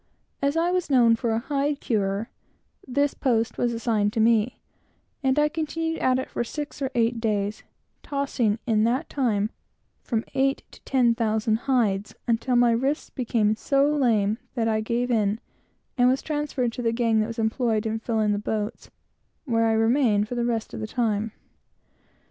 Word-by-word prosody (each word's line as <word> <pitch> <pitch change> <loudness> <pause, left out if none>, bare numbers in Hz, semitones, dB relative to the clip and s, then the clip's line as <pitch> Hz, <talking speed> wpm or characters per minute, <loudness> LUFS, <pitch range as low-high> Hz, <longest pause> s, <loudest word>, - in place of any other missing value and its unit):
As 280 +3 +1
I 340 +2 +2
was 365 -3 -1
known 240 -4 +5
for 230 +1 -2
a 225 - +1
hide 280 +3 -1
curer, 205 0 -1 0.6
this 285 +2 +1
post 230 -3 0
was 240 - +1
assigned 225 -3 0
to - - -1
me, 225 +1 +2 0.6
and 265 0 +1
I 300 0 +4
continued 325 +1 -3
at 255 0 +2
it 260 - -3
for - - -2
six 290 +4 -6
or 270 - 0
eight 230 0 +1
days, 210 -2 -1 0.4
tossing, 270 -6 -1
in 215 -3 +2
that 255 +7 0
time, 220 -6 0 0.5
from 225 -2 -1
eight 270 0 +1
to - - -16
ten 250 -3 +3
thousand 220 -1 +1
hides, 210 -6 +1
until 240 +2 +1
my 240 -1 +5
wrists 265 +6 -1
became 225 -4 +1
so 275 +5 +2
lame 220 -5 +2 0.2
that 230 -2 0
I 220 -1 +1
gave 240 +3 -1
in; 215 -2 +1 0.6
and 245 0 +6
was 265 +2 0
transferred 295 -5 -1
to 245 - -6
the 230 -1 +1
gang 230 -1 +2
that 215 - +1
was 230 - -7
employed 225 -1 0
in 220 0 -1
filling 220 -2 0
the 205 - 0
boats, 210 +1 -4 0.6
where 230 -4 +2
I 225 - +2
remained 225 -2 +3
for 245 - -5
the 240 -1 -1
rest 230 -2 -2
of - - -5
the 215 - -4
time. 220 -2 -1
235 Hz, 180 wpm, -25 LUFS, 220-265 Hz, 0.6 s, and